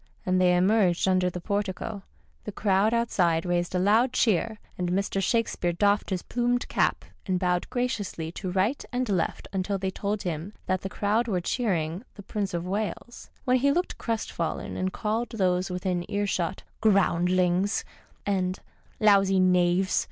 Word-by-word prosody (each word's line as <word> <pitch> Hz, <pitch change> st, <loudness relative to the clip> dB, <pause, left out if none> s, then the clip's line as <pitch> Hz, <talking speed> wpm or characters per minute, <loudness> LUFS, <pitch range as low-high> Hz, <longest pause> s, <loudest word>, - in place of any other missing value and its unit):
As 185 Hz, -, +1 dB
they 180 Hz, -1 st, +4 dB
emerged 190 Hz, -2 st, +3 dB
under 185 Hz, -1 st, +3 dB
the 180 Hz, -, -6 dB
portico 200 Hz, +2 st, -3 dB, 0.4 s
the 210 Hz, -, -4 dB
crowd 200 Hz, +1 st, +2 dB
outside 185 Hz, -8 st, +1 dB
raised 175 Hz, 0 st, -1 dB
a -, -, +3 dB
loud 220 Hz, +7 st, +3 dB
cheer, 220 Hz, 0 st, +1 dB, 0.2 s
and 180 Hz, -1 st, -2 dB
Mr. 195 Hz, +1 st, 0 dB
Shakespeare 195 Hz, -5 st, 0 dB
doffed 205 Hz, +3 st, +2 dB
his 185 Hz, -3 st, -2 dB
plumed 245 Hz, 0 st, 0 dB
cap -, -, 0 dB, 0.2 s
and 185 Hz, -1 st, +1 dB
bowed 180 Hz, -1 st, 0 dB
graciously 205 Hz, -10 st, -2 dB
to 185 Hz, +2 st, -5 dB
right 195 Hz, +9 st, 0 dB
and 250 Hz, 0 st, -1 dB
left 190 Hz, -5 st, -1 dB
until 195 Hz, +1 st, -1 dB
they 190 Hz, 0 st, -2 dB
told 205 Hz, +2 st, -3 dB
him 175 Hz, +2 st, -4 dB
that 185 Hz, 0 st, 0 dB
the 195 Hz, -, -4 dB
crowd 215 Hz, +5 st, 0 dB
were 190 Hz, -5 st, 0 dB
cheering 175 Hz, -3 st, -1 dB
the 200 Hz, -, -10 dB
Prince 200 Hz, -2 st, -3 dB
of 170 Hz, 0 st, -3 dB
Wales, 210 Hz, +5 st, -4 dB, 0.2 s
when 255 Hz, 0 st, +4 dB
he 280 Hz, +3 st, +3 dB
looked 355 Hz, +5 st, -1 dB
crestfallen 220 Hz, -7 st, -3 dB
and 185 Hz, 0 st, -1 dB
called 220 Hz, +4 st, -2 dB
those 185 Hz, -3 st, +1 dB
within 180 Hz, -1 st, -2 dB
earshot 200 Hz, -3 st, -1 dB
" -, -, -39 dB
groundlings 185 Hz, -1 st, +2 dB, 0.2 s
"' -, -, -33 dB
and 185 Hz, 0 st, -1 dB, 0.2 s
" -, -, -34 dB
lousy 195 Hz, -1 st, +4 dB
knaves." 180 Hz, 0 st, +3 dB
190 Hz, 165 wpm, -27 LUFS, 180-215 Hz, 0.4 s, they